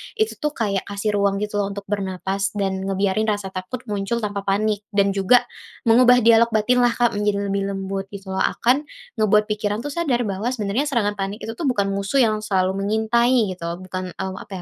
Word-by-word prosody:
itu 435 -1 -1
tuh 300 -1 -2
kayak 200 -4 -1
kasih 205 +1 -2
ruang 200 0 +1
gitu 210 0 -2
loh 200 - 0
untuk 200 - -6
bernapas 195 0 -2
dan 195 -2 -1
ngebiarin 195 +2 0
rasa 205 -3 -1
takut 190 +7 -6
muncul 205 +3 -2
tanpa 200 -1 -3
panik 205 +1 0
dan 200 -1 +3
juga 200 +6 +4 0.4
mengubah 245 +1 +5
dialog 230 0 +6
batin 245 +4 +3
lah 245 -1 +3
Kak 240 -1 +2
menjadi 200 -1 0
lebih 195 0 -1
lembut 195 0 -4
gitu 195 -1 -8
loh 190 - -2
akan 275 +5 +1 0.3
ngebuat 215 0 +4
pikiran 210 +1 -2
tuh 290 - -4
sadar 280 -7 0
bahwa 200 +1 -3
sebenarnya 220 +6 -1
serangan 210 -7 0
panik 195 +3 -4
itu 225 - -4
tuh 275 +7 -3
bukan 200 -6 +1
musuh 200 +7 +1
yang 215 -2 +1
selalu 190 -2 0
mengintai 220 +2 +2
gitu 170 - -7 0.2
bukan, 185 0 -5
eee, 190 0 -4
apa - - -10
205 Hz, 195 wpm, -22 LUFS, 195-235 Hz, 0.4 s, dialog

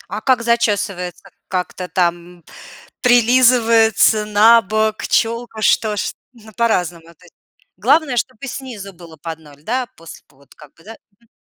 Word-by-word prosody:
А 215 - -5
как 255 -3 +2
зачёсывается, 205 -5 -1 0.2
как-то 180 0 -4
там, 175 -2 +1 0.2
м, - - -28 0.6
прилизывается, 230 -3 +4
набок, 215 0 +3
чёлка, 230 -1 -1
что 210 -1 +2
ж? - - -2 0.2
Ну, 220 -2 -17
по-разному, 175 -8 -1
то - - -22
есть - - -21 0.4
главное, 295 -6 +2
чтобы 255 +2 -3
снизу 235 -7 -8
было 165 -2 -14
под 165 -1 -6
0, 145 -2 -18
да, 250 +5 -2
после 165 -1 -13
вот 140 0 -23
как 150 -2 -16
бы, 165 - -23
да? 225 +2 -10 0.3
Мгм. 235 - -29
215 Hz, 145 wpm, -18 LUFS, 180-235 Hz, 0.6 s, прилизывается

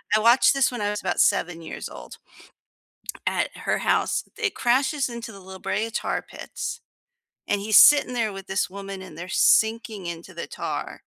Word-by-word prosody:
I - - +4
watched 235 +5 +5
this 275 -1 +2
when 245 -3 -5
I 205 - 0
was 210 - -4
about - - -2
7 170 -1 +2
years 160 - -7
old, - - -11 1.1
at - - -1
her - - -1
house. - - +1
It 445 -3 -1
crashes 265 +2 +1
into 235 -1 -7
the 200 - -12
La 190 0 -11
Brea 220 +4 -2
Tar 225 - -2
Pits, - - -7 0.7
and 205 - +1
he's 210 +1 +5
sitting 290 -4 +7
there 225 -4 -1
with 195 0 -9
this 190 - -1
woman, 195 -1 -7
and 185 -5 -11
they're 175 - -6
sinking 220 -2 +2
into 170 +2 -7
the 170 - -5
tar - - -5
210 Hz, 185 wpm, -24 LUFS, 190-240 Hz, 1.1 s, sitting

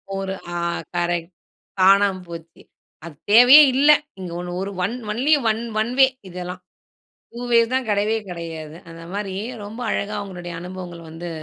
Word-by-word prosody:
ஒரு 195 0 -3 0.2
ஆ. - - -1 0.4
கரெக்ட். 175 0 -1 0.5
காணாம 195 0 +4
போச்சு. 165 -1 -11 0.4
அது 160 -3 -10 0.2
தேவையே 250 +7 +9
இல்ல. 290 +3 +6 0.3
இங்க 180 -2 -6
1 180 - -6
ஒரு 195 +1 -4
1- 230 +7 -1 0.2
ஒன்லி 265 +8 +2 0.2
1- 220 +1 -1 0.2
1 235 +3 -2
வே 265 - +8 0.2
இதெல்லாம். 180 +1 -7 0.7
2 240 - -8
வேஸ் 230 +1 +4
தான் 260 -3 0
கெடையவே 210 +2 +1
கெடையாது. 165 -2 -7
அந்த 165 0 -11
மாரி 200 -2 -4 0.3
ரொம்ப 220 +4 -8
அழகா 210 +1 -2
உங்களுடைய 175 -2 -8
அனுபவங்கள 180 -2 -8
வந்து 170 +2 -7
190 Hz, 150 wpm, -22 LUFS, 175-220 Hz, 0.7 s, தேவையே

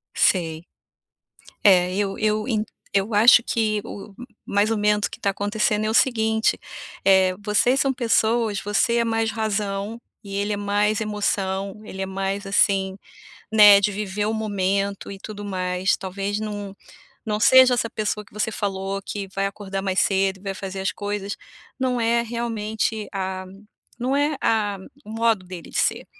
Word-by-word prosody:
Sei. 165 -3 +1 1.0
É, 180 -3 +5
eu 200 -1 -1
eu 215 +1 0
en 215 -4 0 0.3
eu 200 +2 0
acho 230 +3 +7
que 215 -3 0
o 200 0 -9 0.3
mais 205 +2 +1
ou 225 - +1
menos 210 0 +2
que - - -11
está 200 - 0
acontecendo 210 +1 0
é - - 0
o - - -1
seguinte, 220 -2 +2 0.5
eh, 190 -1 +4
vocês 230 +5 +2
são 270 -1 +2
pessoas, 225 -3 +1
você 210 +3 +1
é 235 - +3
mais 225 -1 0
razão, 210 0 -2 0.2
e 195 -1 -7
ele 205 +1 -1
é - - -2
mais 205 +1 +1
emoção, 200 -2 -2
ele 195 -3 -7
é - - -1
mais, 195 +1 -3
assim, 195 -1 +2 0.6
né, 205 -2 +8
de 205 +1 +1
viver 205 0 -3
o 220 - -1
momento 200 -2 -1
e 195 - -8
tudo 205 +1 -8
mais. 185 -1 0
Talvez 195 +2 -3
não 205 -2 -5 0.5
não 210 -1 -1
seja 260 +2 +7
essa 230 -1 -1
pessoa 210 -1 -2
que - - -24
você 210 +1 -1
falou 195 -2 -3
que 200 0 -5
vai 195 0 0
acordar 195 -1 -5
mais 190 -1 +1
cedo 195 -1 +1
e - - -20
vai 195 -1 -4
fazer 190 0 -6
as 190 - 0
coisas, 205 0 -4 0.4
não 255 -2 0
é 235 +1 +2
realmente 220 -2 -3
a 190 -1 -3 0.5
não 255 +3 0
é 290 +1 +1
a 210 -3 +1 0.3
o - - -11
modo 225 -3 +1
dele 180 -3 -9
de - - -3
ser, - - 0
205 Hz, 170 wpm, -23 LUFS, 195-220 Hz, 1.0 s, né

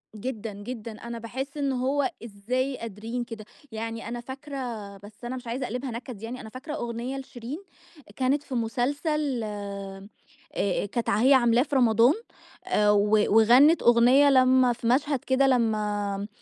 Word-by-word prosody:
جدًا، 220 -1 -5
جدًا. 220 +3 -7
أنا 235 +2 -7
باحس 265 +6 -6
إن 280 -2 0
هو 265 +2 0
إزاي 250 +5 -2
قادرين 230 +2 -5
كده، 225 -3 -9 0.3
يعني 225 +1 -5
أنا 240 0 -5
فاكرة 275 +3 -8 0.4
بس 205 +4 -13
أنا 245 +2 -4
مش 250 -1 -8
عايزة 250 +3 -3
أقلبها 250 +2 -4
نكد 235 -2 -7
يعني، 245 +3 -6
أنا 220 - -9
فاكرة 260 +6 -7
أغنية 240 0 -4
لشيرين، 260 +2 -7 0.6
كانت 275 +2 +1
في 275 -3 -6
مسلسل 270 +3 -1
آآ 200 -2 -6 0.5
أ 200 0 0
كانت 230 +3 -3
ع 200 - +2
هي 265 +3 +6
عاملاه 240 -1 +4
في 290 - -4
رمضان 235 0 +5 0.5
آآ 210 0 +3
و 205 0 +3 0.3
وغنِّت 250 +9 +6
أغنية 245 +4 +6
لمّا 255 -2 +5
في 235 - -5
مشهد 275 +3 +2
كده 265 +1 +3
لمّا 210 -5 0
240 Hz, 155 wpm, -26 LUFS, 220-265 Hz, 0.6 s, هي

